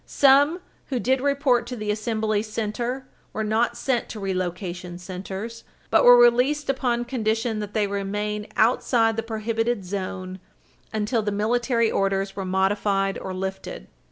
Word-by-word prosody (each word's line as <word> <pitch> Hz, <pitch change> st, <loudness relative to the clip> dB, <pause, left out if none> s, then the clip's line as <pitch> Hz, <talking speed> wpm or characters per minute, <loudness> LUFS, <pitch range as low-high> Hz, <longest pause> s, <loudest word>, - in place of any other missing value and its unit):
Some 285 Hz, +5 st, +4 dB, 0.3 s
who 260 Hz, -3 st, -1 dB
did 260 Hz, +2 st, +1 dB
report 275 Hz, -4 st, +2 dB
to 250 Hz, -, -5 dB
the 210 Hz, -2 st, -2 dB
assembly 215 Hz, 0 st, 0 dB
center 230 Hz, +4 st, -3 dB, 0.3 s
were 220 Hz, -, -2 dB
not 220 Hz, +2 st, +1 dB
sent 255 Hz, -3 st, -1 dB
to 220 Hz, -, -6 dB
relocation 180 Hz, -2 st, -4 dB
centers, 190 Hz, +5 st, -7 dB, 0.3 s
but -, -, +5 dB
were 245 Hz, 0 st, +9 dB
released 250 Hz, +5 st, +4 dB
upon 240 Hz, -2 st, -1 dB
condition 225 Hz, -2 st, -1 dB
that 210 Hz, 0 st, -6 dB
they 215 Hz, -1 st, +2 dB
remain 205 Hz, +1 st, -3 dB
outside 225 Hz, 0 st, +3 dB
the 225 Hz, -, -1 dB
prohibited 225 Hz, -1 st, -2 dB
zone 185 Hz, -1 st, -5 dB, 0.5 s
until 220 Hz, +2 st, 0 dB
the 210 Hz, -1 st, -2 dB
military 230 Hz, +3 st, +1 dB
orders 195 Hz, 0 st, 0 dB
were 195 Hz, -, -4 dB
modified 195 Hz, +1 st, +1 dB
or 190 Hz, -, -6 dB
lifted. 190 Hz, -, -5 dB
215 Hz, 145 wpm, -24 LUFS, 195-240 Hz, 0.5 s, were